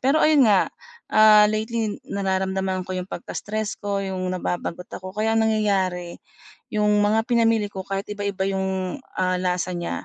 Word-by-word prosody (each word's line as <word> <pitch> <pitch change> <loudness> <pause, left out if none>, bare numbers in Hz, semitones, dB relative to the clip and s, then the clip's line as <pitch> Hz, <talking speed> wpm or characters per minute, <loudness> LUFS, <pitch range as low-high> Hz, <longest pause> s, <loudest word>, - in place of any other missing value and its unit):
Pero 275 +4 +3
ayun 305 -3 +5
nga, 200 -3 +4 0.4
ah, 215 -1 +7
lately 220 0 -2
nararamdaman 190 -1 -1
ko - - -3
yung 180 +1 -4
pagka-stress 210 +4 -4
ko, 200 -1 -2
yung 185 -1 -3
nababagot 180 -1 -3
ako. 185 0 -7
Kaya 220 +1 +1
ang 225 - +3
nangyayari 190 -5 0 0.5
yung 210 -1 +2
mga 215 +2 +2
pinamili 225 -3 +2
ko 190 - -5
kahit 195 0 -3
iba-iba 200 -2 -2
yung, 190 +3 -2 0.2
ah, 185 0 +1
lasa 180 -1 -1
niya, 175 -1 -4
200 Hz, 155 wpm, -23 LUFS, 185-215 Hz, 0.5 s, ah